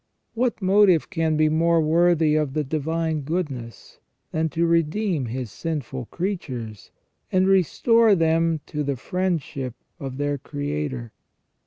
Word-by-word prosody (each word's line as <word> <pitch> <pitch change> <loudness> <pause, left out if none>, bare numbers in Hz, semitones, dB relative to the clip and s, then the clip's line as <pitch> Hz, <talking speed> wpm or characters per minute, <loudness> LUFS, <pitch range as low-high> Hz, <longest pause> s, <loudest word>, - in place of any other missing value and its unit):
What 235 -3 -1
motive 190 -3 +4
can 160 -3 0
be 155 0 +4
more 165 +2 +3
worthy 160 0 +3
of 150 -3 0
the 155 - 0
Divine 160 +2 -1
Goodness 140 -7 -5 0.3
than 160 0 0
to 165 +4 0
redeem 165 - +1
His 120 -1 -5
sinful 135 - -4
creatures, 130 - -5 0.4
and 185 0 +3
restore 210 +4 +4
them 165 -1 +2
to 150 - -4
the 140 -1 -1
friendship 150 - -2 0.2
of 135 -2 -6
their 145 0 -1
Creator? 145 -4 -4
160 Hz, 130 wpm, -24 LUFS, 140-175 Hz, 0.4 s, motive